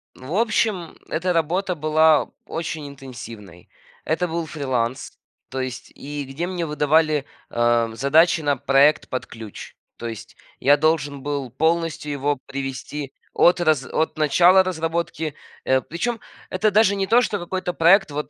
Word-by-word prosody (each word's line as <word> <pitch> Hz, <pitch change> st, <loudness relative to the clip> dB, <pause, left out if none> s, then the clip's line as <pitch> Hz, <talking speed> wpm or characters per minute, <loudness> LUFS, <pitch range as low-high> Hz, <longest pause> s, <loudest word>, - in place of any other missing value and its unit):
В 130 Hz, +6 st, -8 dB
общем, 215 Hz, -6 st, 0 dB
эта 180 Hz, +3 st, -1 dB
работа 180 Hz, +3 st, 0 dB
была 155 Hz, 0 st, +3 dB, 0.2 s
очень 160 Hz, -2 st, -5 dB
интенсивной. 115 Hz, -9 st, -11 dB, 0.3 s
Это 175 Hz, +3 st, 0 dB
был 165 Hz, 0 st, -3 dB
фриланс, 130 Hz, -4 st, -3 dB, 0.3 s
то 130 Hz, 0 st, -3 dB
есть 130 Hz, -1 st, -6 dB
и 145 Hz, 0 st, -6 dB
где 145 Hz, +7 st, -4 dB
мне 180 Hz, -2 st, -3 dB
выдавали, 150 Hz, -1 st, +2 dB, 0.2 s
а, 120 Hz, -1 st, +2 dB
задачи 160 Hz, +7 st, +3 dB
на 145 Hz, -1 st, +1 dB
проект 140 Hz, +3 st, +3 dB
под 130 Hz, -, -3 dB
ключ. 110 Hz, -3 st, -10 dB, 0.2 s
То 120 Hz, -, -5 dB
есть 110 Hz, -1 st, -8 dB, 0.2 s
я 145 Hz, +2 st, +5 dB
должен 145 Hz, -3 st, 0 dB
был 140 Hz, -3 st, -3 dB
полностью 160 Hz, +2 st, 0 dB
его 145 Hz, 0 st, -1 dB
привести 135 Hz, +1 st, -5 dB, 0.2 s
от 175 Hz, 0 st, +4 dB
раз 155 Hz, -6 st, +2 dB
от 160 Hz, +4 st, -1 dB
начала 175 Hz, +5 st, +5 dB
разработки. 165 Hz, -3 st, -2 dB, 0.3 s
Э, 130 Hz, 0 st, +3 dB
причем 225 Hz, -, -3 dB, 0.3 s
это 215 Hz, -1 st, +1 dB
даже 200 Hz, -1 st, +4 dB
не 195 Hz, -1 st, -1 dB
то, 235 Hz, +3 st, +5 dB
что 210 Hz, -3 st, -1 dB
какой-то 180 Hz, +1 st, -3 dB
проект, 175 Hz, 0 st, +4 dB
вот 150 Hz, +1 st, -4 dB
155 Hz, 150 wpm, -22 LUFS, 135-170 Hz, 0.3 s, я